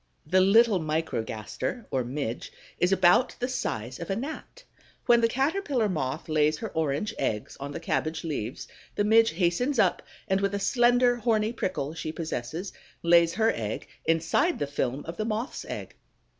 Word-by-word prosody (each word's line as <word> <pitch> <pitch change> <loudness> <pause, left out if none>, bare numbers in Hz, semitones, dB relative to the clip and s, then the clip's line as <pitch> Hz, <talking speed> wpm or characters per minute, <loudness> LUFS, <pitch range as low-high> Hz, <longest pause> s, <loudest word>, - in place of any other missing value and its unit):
The 185 +5 +3
little 210 +1 +5
Microgaster 155 - -3
or 130 - +1
Midge 125 -1 -4 0.3
is 180 - +2
about 190 +6 +4
the 250 - -1
size 130 - -3
of 170 - -6
a 195 - 0
Gnat. 310 - -7 0.4
When 240 -1 +5
the 230 - +5
Caterpillar 270 - 0
moth 150 -9 -3
lays 155 -1 +2
her - - -5
orange 160 +7 -1
eggs 105 -1 -2
on 140 +1 -5
the - - -5
cabbage 160 -1 -2
leaves, 135 -7 -4 0.3
the 205 - +1
Midge 225 0 +5
hastens 185 - +1
up - - +3 0.3
and 190 -1 +1
with 200 0 0
a - - -1
slender, 245 +2 +3
horny 220 -1 +1
prickle 170 - -2
she 155 -1 -4
possesses, 160 +2 -4 0.3
lays 170 0 +5
her 225 0 +3
egg 110 -2 -4 0.2
inside 165 - +2
the - - -1
film 140 -1 -2
of 165 +1 -7
the 215 - -1
Moth's 225 +4 -3
egg. - - -6
180 Hz, 170 wpm, -27 LUFS, 150-230 Hz, 0.4 s, little